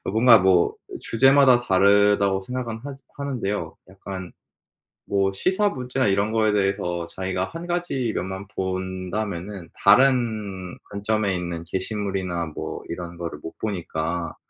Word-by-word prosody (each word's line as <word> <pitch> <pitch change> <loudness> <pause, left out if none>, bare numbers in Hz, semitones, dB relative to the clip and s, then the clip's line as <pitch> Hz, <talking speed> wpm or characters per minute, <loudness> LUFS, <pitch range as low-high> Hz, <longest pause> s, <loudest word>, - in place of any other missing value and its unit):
그 - - -7
뭔가 115 +2 +7
뭐 95 -2 +3 0.2
주제마다 135 +1 +5
다르다고 100 -1 +4
생각은 120 +2 -4
하 140 +4 -7 0.2
하는데요. 125 -8 -3
약간 95 -1 -8 0.7
뭐 95 -1 +1
시사 190 - +1
문제나 130 - -1
이런 100 +2 +1
거에 110 -1 +3
대해서 95 -4 0
자기가 95 +1 -2
1 165 - -8
가지 175 -9 -1
면만 95 +2 -4
본다면은 95 0 -4
다른 110 -5 +2
관점에 100 -1 0
있는 85 -2 -4
게시물이나 95 -2 -2
뭐 80 - -6
이런 85 0 -6
거를 85 -1 -5
못 80 - -8
보니까 85 -4 -3
100 Hz, 275 characters per minute, -24 LUFS, 95-115 Hz, 0.7 s, 뭔가